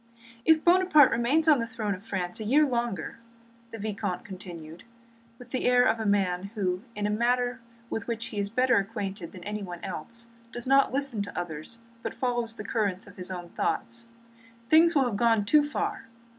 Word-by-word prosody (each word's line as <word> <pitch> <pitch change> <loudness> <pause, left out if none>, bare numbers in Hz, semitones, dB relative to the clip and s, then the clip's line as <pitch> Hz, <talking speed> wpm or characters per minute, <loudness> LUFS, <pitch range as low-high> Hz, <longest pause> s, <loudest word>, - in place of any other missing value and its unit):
"If 320 -1 +5
Buonaparte 350 -5 +6
remains 270 +8 +2
on 300 -4 +6
the 230 - -2
throne 220 -2 -2
of 185 +1 -8
France 185 -4 -4
a - - -4
year 285 +8 +4
longer," 235 - -2 0.5
the 225 - -8
vicomte 200 -3 -3
continued, 175 -4 -9 0.5
with 245 0 -14
the 255 - -2
air 250 0 +5
of 225 0 +2
a 220 - -1
man 190 -2 +1
who, 185 -3 -1
in 205 0 -2
a 210 - +1
matter 245 +3 +1 0.3
with 225 -3 -4
which 230 -1 -3
he 210 - -4
is 200 0 -1
better 255 +3 +3
acquainted 200 -3 -3
than 180 - -11
anyone 195 -4 -5
else, 230 +9 -6 0.3
does 240 - -5
not 275 +1 +4
listen 270 -5 -1
to 200 - -4
others 175 +7 -6 0.2
but - - -5
follows 240 -3 -1
the 210 - -7
current 200 -4 -1
of - - -15
his 180 0 -4
own 175 -2 -6
thoughts, 235 +5 -2 0.6
"things 330 +3 +5
will 275 -2 +4
have 225 -5 -1
gone 225 -2 +3
too 300 +8 +5
far. 290 -5 -3
225 Hz, 190 wpm, -28 LUFS, 195-245 Hz, 0.6 s, Buonaparte